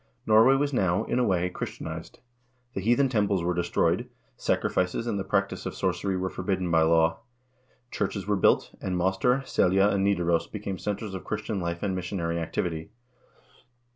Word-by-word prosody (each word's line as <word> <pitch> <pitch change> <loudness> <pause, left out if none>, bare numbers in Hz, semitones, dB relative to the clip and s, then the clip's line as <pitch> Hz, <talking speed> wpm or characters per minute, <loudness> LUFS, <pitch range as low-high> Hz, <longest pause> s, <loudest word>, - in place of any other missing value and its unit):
2 - - -3
Norway 115 +5 +7
was 145 +1 0
now, 95 -3 +2
in 120 - -1
a - - +3
way, 90 -5 +1
Christianized. 80 -2 -7 0.5
The 95 - -3
heathen 120 +7 +3
temples 105 -7 +1
were 90 +1 +1
destroyed, 85 0 0 0.3
sacrifices 90 +5 0
and 105 -4 -1
the - - -2
practice 100 +1 -1
of - - -5
sorcery 95 -2 -1
were 95 0 -2
forbidden 90 -1 -2
by 80 -1 +4
law; 80 0 +3 0.7
churches 100 -3 -2
were 105 0 +1
built, 95 - +2
and 90 -1 -2
Moster, 95 +9 +1
Selja, 95 0 +3
and 100 -1 +1
Nidaros 85 -4 +1
became 100 -3 -5
centers 105 0 -4
of 95 - -6
Christian 105 -1 -3
life 85 -1 -3
and 100 -2 0
missionary 85 -2 -2
activity. 80 -1 -3
95 Hz, 170 wpm, -27 LUFS, 85-105 Hz, 0.7 s, Norway